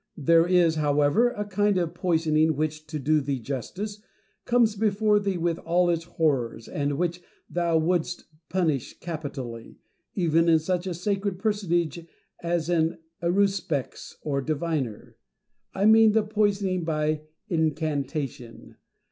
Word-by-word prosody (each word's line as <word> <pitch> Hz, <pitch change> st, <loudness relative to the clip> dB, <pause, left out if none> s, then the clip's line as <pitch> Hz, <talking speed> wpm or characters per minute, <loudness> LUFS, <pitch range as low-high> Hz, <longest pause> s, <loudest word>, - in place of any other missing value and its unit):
There 165 Hz, +3 st, +4 dB
is, 175 Hz, -3 st, +3 dB
however, 150 Hz, +10 st, +3 dB
a 210 Hz, -4 st, -4 dB
kind 205 Hz, 0 st, +1 dB
of 170 Hz, -3 st, -1 dB
poisoning 160 Hz, -3 st, +2 dB
which, 155 Hz, +1 st, -3 dB
to 155 Hz, +1 st, -4 dB
do 150 Hz, +2 st, +2 dB
thee 135 Hz, 0 st, -2 dB
justice, 185 Hz, -, -5 dB, 0.4 s
comes 235 Hz, -3 st, +3 dB
before 210 Hz, 0 st, +2 dB
thee 200 Hz, -2 st, -1 dB
with 170 Hz, -1 st, -1 dB
all 175 Hz, +1 st, +2 dB
its 165 Hz, -1 st, -2 dB
horrors, 130 Hz, -9 st, -1 dB
and 145 Hz, -1 st, -2 dB
which 175 Hz, 0 st, -1 dB, 0.3 s
thou 170 Hz, -1 st, +1 dB
wouldst 175 Hz, +1 st, 0 dB, 0.3 s
punish 160 Hz, -8 st, -1 dB
capitally, 140 Hz, -8 st, -6 dB, 0.4 s
even 165 Hz, -2 st, +3 dB
in 165 Hz, -, +6 dB
such 180 Hz, +3 st, -2 dB
a 180 Hz, -, -3 dB
sacred 195 Hz, +1 st, -1 dB
personage 175 Hz, -5 st, -1 dB, 0.4 s
as 170 Hz, -1 st, -1 dB
an 165 Hz, -2 st, +1 dB, 0.2 s
aruspex 175 Hz, -5 st, -1 dB
or 140 Hz, -2 st, -1 dB
diviner: 150 Hz, -6 st, -3 dB, 0.5 s
I 195 Hz, -, 0 dB
mean 220 Hz, 0 st, +7 dB
the 220 Hz, 0 st, +3 dB
poisoning 205 Hz, -4 st, 0 dB
by 155 Hz, -1 st, 0 dB, 0.3 s
incantation. 150 Hz, -, -3 dB
170 Hz, 130 wpm, -26 LUFS, 155-190 Hz, 0.5 s, mean